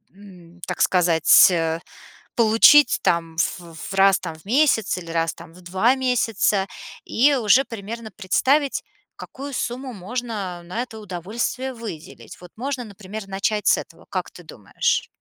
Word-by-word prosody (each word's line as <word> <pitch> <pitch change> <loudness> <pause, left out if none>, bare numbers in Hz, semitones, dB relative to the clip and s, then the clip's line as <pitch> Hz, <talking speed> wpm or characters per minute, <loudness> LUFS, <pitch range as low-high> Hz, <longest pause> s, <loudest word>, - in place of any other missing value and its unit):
м, 180 -4 -16
так - - -4
сказать, 170 -3 +5
э, 165 -2 0 0.6
получить, 230 +6 +6
там, 165 -1 0
в 170 +1 -2
в 160 +4 -8
раз, 195 0 +5
там, 165 -3 -7
в 160 - -19
месяц 235 -3 +2
или 170 -2 -10
раз, 165 0 0
там, 165 -1 -14
в 180 - -16
2 190 +8 +2
месяца 225 -6 +1 0.4
и 280 +5 +3
уже 245 +1 +4
примерно 225 0 -8
представить 265 +9 +1 0.3
какую 280 +1 -9
сумму 255 +1 -4
можно 205 -3 -5
на 180 +7 -4
это 225 -3 -10
удовольствие 215 +7 -4
выделить. 160 - -10
Вот 180 -1 -14
можно, 265 +2 -4
например, 205 -1 -9
начать 200 +2 -2
с - - +5
этого, - - -12
как - - -3
ты - - -14
думаешь? 475 0 -2
205 Hz, 150 wpm, -22 LUFS, 175-240 Hz, 0.6 s, получить